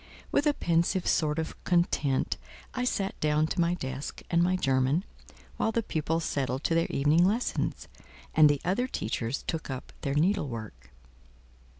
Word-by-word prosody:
With 290 - +2
a 295 - +3
pensive 170 +2 +1
sort 150 -1 +2
of 160 0 -4
content, 165 -6 +1 0.4
I 250 -1 -1
sat 195 -5 -1
down 150 0 +2
to 165 - -1
my 170 +1 +2
desk 135 -3 -5
and 170 0 +4
my 180 +2 +3
German, 135 +1 +2 0.5
while 220 - +1
the 230 +1 0
pupils 160 -1 -1
settled 130 0 -1
to - - +1
their 165 0 +2
evening 150 +5 +3
lessons; 215 +7 0 0.5
and 155 -1 +7
the 145 -1 +1
other 200 +8 +1
teachers 120 - -3
took 160 -3 -3
up 130 -1 -6
their 140 0 -1
needlework. 120 - -1
160 Hz, 160 wpm, -29 LUFS, 140-180 Hz, 0.5 s, and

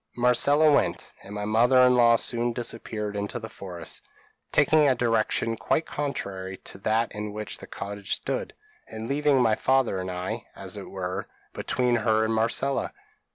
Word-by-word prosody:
Marcella 140 +5 +4
went; 90 -10 0
and 100 +2 -9
my 105 0 -3
mother 115 +4 +4
in 125 - +5
law 120 -1 +6
soon 120 +1 0
disappeared 110 -3 -3
in 100 0 -2
the 110 - -6
forest, 90 -6 -8 0.5
taking 155 -2 +4
a 130 - +3
direction 115 -1 +1
quite 160 +7 0
contrary 95 -10 -4
to - - -10
that 110 +3 0
in 105 0 -4
which 105 0 -6
the - - -10
cottage 100 0 -3
stood, - - -4 0.3
and 110 +1 -7
leaving 145 0 +2
my 115 -3 +4
father 130 -3 +2
and 95 0 -4
I, 90 0 -4
as - - -7
it - - -8
were, 95 0 -4 0.3
between 125 -1 0
her 110 -1 +2
and 110 - 0
Marcella. 115 +5 0
110 Hz, 165 wpm, -26 LUFS, 100-125 Hz, 0.5 s, law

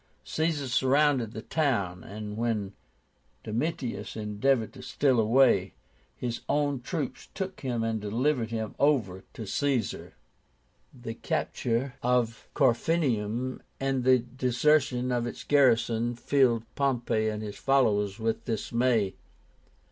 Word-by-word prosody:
Caesar 155 - -1
surrounded 130 -2 +2
the 110 0 -7
town, 100 - 0
and 105 0 -7
when 110 -4 -1 0.7
Domitius 125 +3 -3
endeavored 110 +3 0
to 130 - -11
steal 130 -3 +1
away, 110 -4 +4 0.4
his 120 -2 -3
own 145 -2 +1
troops 145 +1 -4
took 190 -1 -4
him 120 -4 -1
and 110 -1 -1
delivered 115 +3 0
him 110 -2 -3
over 110 -11 +2
to 110 - -7
Caesar. 130 +1 -1 0.8
The 120 -2 -7
capture 120 +3 -2
of 120 -2 0
Corfinium 130 -3 +1 0.2
and 135 -1 0
the 130 0 +6
desertion 125 +1 +1
of 120 -1 0
its - - -7
garrison 120 -4 +3
filled 120 -2 +2
Pompey 120 -5 0
and 105 0 -4
his 105 -1 -6
followers 105 -7 +2
with 115 -1 -2
dismay. 115 -2 +1
120 Hz, 115 wpm, -28 LUFS, 110-135 Hz, 0.8 s, the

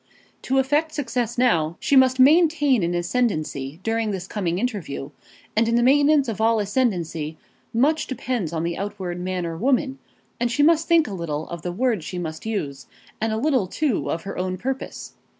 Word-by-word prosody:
To 265 - 0
effect 295 +4 +1
success 250 -5 -2
now, 170 -10 +2
she 280 - +1
must 260 -1 +5
maintain 295 - +5
an 170 0 0
ascendancy 170 - -1
during 225 -1 0
this 190 -3 -3
coming 180 -4 -2
interview, 190 - -3 0.4
and 225 +1 +3
in 230 - +2
the 240 - +3
maintenance 285 +2 +4
of 220 -2 -3
all 225 0 +3
ascendancy, 175 - -1 0.3
much 290 +7 +2
depends 240 - -3
on 165 -1 -2
the 170 0 -2
outward 190 -3 -4
man 180 -1 -2
or 165 -1 -4
woman; 265 - +1 0.4
and 240 0 0
she 285 +5 +2
must 325 +1 +4
think 335 -3 +4
a 205 - -5
little 160 -4 -4
of 170 -2 -6
the 175 - -3
words 225 -2 0
she 180 - -6
must 160 +2 -5
use, 140 - -4 0.3
and 225 0 0
a 220 - -1
little, 260 -6 +1
too, 280 +4 -1
of 165 - -2
her 195 - -6
own 185 0 -2
purpose. 265 +7 -5
220 Hz, 185 wpm, -23 LUFS, 175-260 Hz, 0.4 s, must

